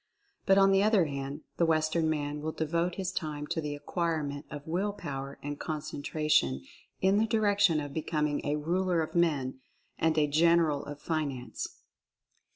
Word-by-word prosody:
But, 195 0 +6
on 195 0 +6
the 195 0 +4
other 205 -4 +4
hand, 140 0 -5 0.2
the 170 - +3
Western 160 0 +2
man 150 -1 -2
will 160 +1 -2
devote 170 +3 -1
his 190 -2 -2
time 150 -5 -3
to 165 +1 -2
the 150 -1 -3
acquirement 150 -2 -2
of 145 -1 -7
Will 190 +5 -1
Power 140 -6 -6
and 145 0 -4
Concentration 150 - 0 0.4
in 195 +2 +4
the 225 - +2
direction 205 -6 +3
of 145 -1 -5
becoming 150 -2 -1
a 145 - 0
Ruler 170 +2 +1
of 155 - -7
Men 145 -7 +1 0.4
and 160 -1 +2
a 150 - +5
General 160 -1 +3
of 145 0 -7
Finance. 140 -8 -4
155 Hz, 165 wpm, -30 LUFS, 145-170 Hz, 0.4 s, But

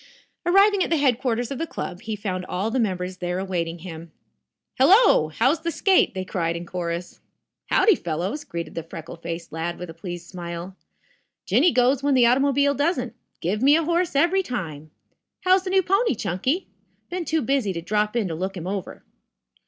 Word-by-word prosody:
Arriving 395 +2 +5
at - - -3
the 330 - +2
headquarters 245 -3 +1
of 275 - -4
the 330 - -2
club, 180 - -6
he 220 -2 -4
found 185 -3 -3
all 195 +5 -2
the 260 - 0
members 185 -4 -2
there 180 0 -3
awaiting 175 -3 -2
him. 165 -1 -9 0.7
"Hello! 365 - +6
How's 255 - +1
the 335 - -2
skate!" 335 - +3
they 185 0 -3
cried 170 -3 -1
in 170 +1 -5
chorus. 175 0 -4 0.5
"Howdy, 440 - +5
fellows," 180 - -3
greeted 170 -1 -6
the 165 - -3
freckle 165 0 -9
faced 170 0 -6
lad 165 +2 -3
with 180 -1 -7
a - - -11
pleased 175 +1 -7
smile. 175 0 -7 0.7
"Jinny 355 - +4
goes 255 +2 +3
when 280 -1 +2
the 250 -2 +5
automobile 280 +3 +3
doesn't. 285 -4 -1 0.3
Give 200 +6 -1
me 280 +3 +6
a 330 - +2
horse 340 -1 0
every 345 +7 +3
time. 160 - -5 0.5
How's 370 +1 +3
the - - -2
new 380 0 +3
pony, 390 - +2
Chunky? 255 - -1 0.5
Been 360 0 -2
too 320 -1 0
busy 265 -5 +1
to 170 - -4
drop 210 +4 0
in 225 -5 +1
to - - -3
look 190 +4 -4
him 170 - -6
over." 195 0 -5
215 Hz, 185 wpm, -24 LUFS, 175-285 Hz, 0.7 s, Hello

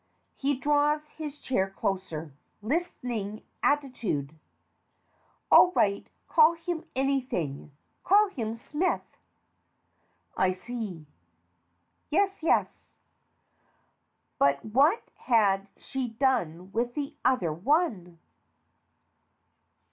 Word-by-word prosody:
(He 280 0 0
draws 295 +2 +1
his 300 -2 -7
chair 195 -9 -1
closer. 185 -6 -3 0.3
Listening 235 - -3 0.2
attitude.) 240 - 0 1.2
All 360 - +8
right. 200 - +1 0.2
Call 320 0 +6
him 335 0 -5
anything 255 - -1 0.3
call 410 +2 +5
him 230 - -4
Smith. 305 +9 -1 1.3
I 185 0 +2
see. 195 -5 -6 1.0
Yes, 390 +4 +1
yes. 320 - +1 1.5
But 140 0 +3
what 280 - +3
had 200 -5 +2
she 265 -2 -4
done 225 - -1
with 240 +3 -1
the 285 -1 -3
other 225 -12 +2
one? 195 - 0
245 Hz, 85 wpm, -28 LUFS, 195-295 Hz, 1.5 s, All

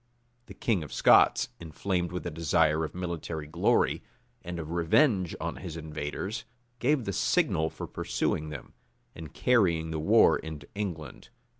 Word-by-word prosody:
[] 120 0 -41
The - - -11
king 110 -7 0
of 75 - -8
Scots, - - +5
inflamed 85 +2 -2
with 90 - -5
a 85 - -3
desire 80 0 +2
of 80 - -5
military 85 -3 -4
glory, 85 +4 +1 0.4
and 85 0 -5
of 80 -1 -6
revenge 90 - +2
on 85 +1 -4
his 85 -4 -7
invaders, 80 +6 -5 0.4
gave 135 -1 +1
the 100 - -2
signal 80 -2 +1
for - - -7
pursuing 75 0 -2
them, 75 - -9 0.4
and 80 -3 -9
carrying 85 - +2
the 80 - -2
war 75 - +5
into 75 -2 -8
England. 85 -9 -6
85 Hz, 155 wpm, -28 LUFS, 80-95 Hz, 0.4 s, Scots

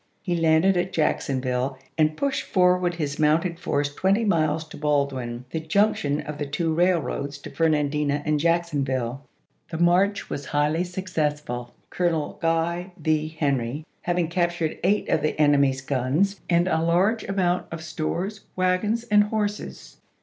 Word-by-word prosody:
He 175 -3 -1
landed 165 +3 +3
at 175 +1 -1
Jacksonville 130 -4 0 0.2
and 155 -1 +2
pushed 280 -1 0
forward 180 -1 +2
his 145 -3 -3
mounted 165 +3 +2
force 145 -4 -1
twenty 195 +8 +2
miles 160 -5 +1
to - - -10
Baldwin, 140 -5 -1
the 160 - -2
junc 200 +7 +2
tion 145 +1 -1
of 150 0 -7
the 145 - -1
two 160 +3 -1
railroads 155 -5 0
to 145 - -10
Fernandina 150 -2 +1
and 150 -1 +1
Jack 170 +2 +2
sonville. 135 -5 -2 0.5
The 160 - -4
march 180 +4 +2
was 145 - -5
highly 150 +4 +1
successful. 150 -9 -3 0.2
Colonel 170 -4 -1
Guy 170 +2 0
V. 155 -2 0
Henry 145 -3 -2 0.2
having 175 -1 0
captured 170 -2 -1
eight 200 +3 +2
of - - +1
the 155 - -1
en 145 -1 +5
emy's 135 -1 +2
guns, 140 +10 0
and 175 0 +3
a 160 -3 +1
large 185 +7 +2
amount 180 -2 0
of 165 -1 -6
stores, 170 +6 -3
wagons, 185 +5 +1
and 205 0 +6
horses. 210 -1 -4
160 Hz, 155 wpm, -24 LUFS, 145-180 Hz, 0.5 s, and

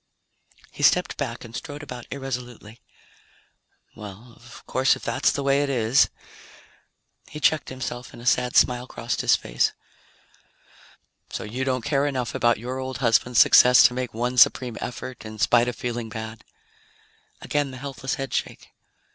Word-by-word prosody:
He - - -10
stepped 180 -1 +3
back 125 -4 -5
and 115 0 -11
strode 145 0 -7
about 125 -4 -9
irresolutely. 125 -4 -7 1.1
"Well, 105 +4 -11
of 120 0 -15
course, 130 +1 +2
if - - -12
that's 130 - +1
the 140 - -3
way 140 +1 +2
it 145 - -1
is 120 -1 +3 0.6
..." - - -36
He 150 - -8
checked 155 +1 +2
himself 125 -1 -6
and - - -13
a 120 - -11
sad 125 -1 +1
smile 125 0 +3
crossed - - -3
his - - +4
face. - - 0 1.6
"So - - -5
you 120 +5 -4
don't 130 -3 -1
care 145 -1 +1
enough 130 -4 -3
about 120 0 +2
your 125 +4 -5
old 130 -1 -5
husband's 120 0 +2
success 125 0 +7
to - - +5
make 125 -1 -3
one 125 +2 -1
supreme 120 +1 +4
effort 125 +1 -7
in 110 0 -9
spite 120 +2 +3
of 125 - -3
feeling 120 -2 -4
bad?" 110 0 -7 1.0
Again 145 -1 -1
the 130 - -9
helpless 135 0 -4
headshake. 135 -1 -4
125 Hz, 160 wpm, -24 LUFS, 120-135 Hz, 1.6 s, success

